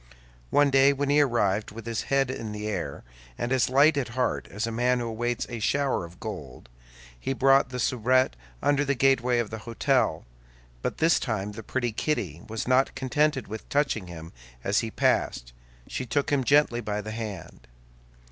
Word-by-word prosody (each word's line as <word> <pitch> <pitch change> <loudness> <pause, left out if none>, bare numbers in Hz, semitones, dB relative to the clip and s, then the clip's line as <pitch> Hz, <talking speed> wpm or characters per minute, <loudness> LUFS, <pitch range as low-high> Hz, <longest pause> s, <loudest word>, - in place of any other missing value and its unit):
One 145 -1 +4
day, 135 +1 +5
when 140 0 -1
he 150 +1 +5
arrived 110 -6 +1
with 115 +1 -10
his 115 -1 -3
head 135 -2 +2
in 110 -4 -5
the 105 0 -4
air, 90 -9 -4 0.3
and 120 - -3
as 130 -3 +2
light 145 +3 +5
at 140 - 0
heart 125 - 0
as 105 +3 -3
a 115 - -3
man 125 +2 +1
who 120 - -2
awaits 120 +1 -2
a 120 -1 -6
shower 135 -3 0
of 85 +2 -14
gold, 70 - -8 0.5
he 135 - -2
found 135 0 +4
the 125 0 -5
soubrette 125 - +2 0.3
under 145 0 +3
the 140 -1 0
gateway 125 -2 +3
of 115 -3 -1
the 110 - -5
hôtel; 115 - 0 0.6
but - - -3
this 160 +1 +3
time 105 -4 -2
the 105 - -8
pretty 120 +2 -2
Kitty 100 - -2
was 110 +1 -4
not 130 +1 +3
contented 145 +1 0
with 110 +1 -8
touching 140 -9 0
him 80 -1 -9 0.3
as 100 +1 +2
he 115 - -2
passed, - - 0 0.3
she 130 - -5
took 145 +5 0
him 140 -2 +2
gently 140 -3 +3
by 105 -2 -3
the 110 +1 -6
hand. 110 -3 -7
120 Hz, 185 wpm, -27 LUFS, 105-135 Hz, 0.6 s, day